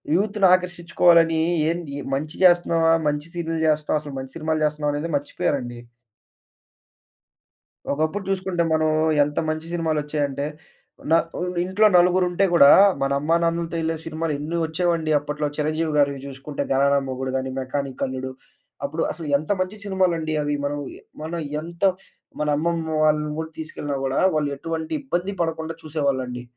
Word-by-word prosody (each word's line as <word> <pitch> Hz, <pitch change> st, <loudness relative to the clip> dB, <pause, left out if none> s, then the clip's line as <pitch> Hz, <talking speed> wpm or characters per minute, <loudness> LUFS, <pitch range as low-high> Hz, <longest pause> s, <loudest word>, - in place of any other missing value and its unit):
యూత్‌నాకర్షించుకోవాలని 175 Hz, -4 st, +3 dB, 0.3 s
ఎన్ 170 Hz, +1 st, -4 dB
యే 145 Hz, -, -4 dB
మంచి 155 Hz, +3 st, -4 dB
చేస్తున్నామా? 170 Hz, -2 st, +4 dB, 0.2 s
మంచి 150 Hz, +1 st, -1 dB
సీన్లు 165 Hz, -2 st, -3 dB
చేస్తున్నామ? 150 Hz, 0 st, +1 dB
అసలు 145 Hz, -2 st, -8 dB
మంచి 130 Hz, 0 st, -8 dB
సినిమాలు 155 Hz, 0 st, -1 dB
చేస్తున్నామానేది 150 Hz, +1 st, -1 dB
మర్చిపోయారండి. 125 Hz, -4 st, -2 dB, 2.1 s
ఒకప్పుడు 155 Hz, +7 st, -1 dB
జూసుకుంటే 185 Hz, -2 st, 0 dB
మనం 155 Hz, 0 st, +2 dB, 0.3 s
ఎంత 145 Hz, +1 st, -2 dB
మంచి 155 Hz, +1 st, -3 dB
సినిమాలొచ్చాయంటే, 150 Hz, -4 st, -1 dB, 0.7 s
న -, -, +6 dB, 0.3 s
ఉన్ 180 Hz, 0 st, -3 dB
ఇంట్లో 205 Hz, +4 st, +4 dB
నలుగురుంటే 180 Hz, +1 st, +3 dB
గూడా 140 Hz, -5 st, +8 dB, 0.3 s
మన 135 Hz, -, +1 dB
అమ్మానాన్నలతో 170 Hz, +2 st, 0 dB
ఎళ్ళే 160 Hz, 0 st, -1 dB
సినిమాలేన్ని 160 Hz, 0 st, -3 dB
ఒచ్చేవండి 165 Hz, -1 st, 0 dB
అప్పట్లో. 150 Hz, +1 st, -3 dB
చిరంజీవి 155 Hz, +1 st, -1 dB
గారివి 140 Hz, -1 st, +2 dB
జూసుకుంటే 140 Hz, +1 st, -5 dB
గరానా 140 Hz, +1 st, +3 dB
మొగుడు 130 Hz, 0 st, -3 dB
గాని, 130 Hz, 0 st, -3 dB
మెకానిక్ 135 Hz, 0 st, -3 dB
అల్లుడు. 130 Hz, 0 st, -5 dB, 0.5 s
అప్పుడు 155 Hz, +4 st, -3 dB
అసలేంత 150 Hz, +1 st, -1 dB
మంచి 185 Hz, +3 st, -3 dB
సినిమాలండి 175 Hz, -5 st, 0 dB
అవి. 145 Hz, 0 st, -1 dB
మనం 145 Hz, 0 st, -2 dB, 0.2 s
యె -, -, -14 dB, 0.2 s
మనం 170 Hz, +2 st, -4 dB, 0.2 s
ఎంత 170 Hz, +3 st, -9 dB, 0.6 s
మన 150 Hz, -, 0 dB
అమ్మమ్మ 165 Hz, +1 st, -1 dB
వాళ్ళని 150 Hz, 0 st, +2 dB
గూడా 160 Hz, 0 st, -4 dB
తీసుకెళ్ళినా 145 Hz, -2 st, -4 dB
గూడా 135 Hz, 0 st, 0 dB
వాళ్ళు 150 Hz, -2 st, 0 dB
ఎటువంటి 160 Hz, +2 st, -4 dB
ఇబ్బంది 190 Hz, -7 st, -2 dB
పడకుండా 160 Hz, -1 st, -2 dB
చూసేవాళ్ళండి. 135 Hz, -6 st, -2 dB
155 Hz, 130 wpm, -23 LUFS, 145-170 Hz, 2.1 s, గూడా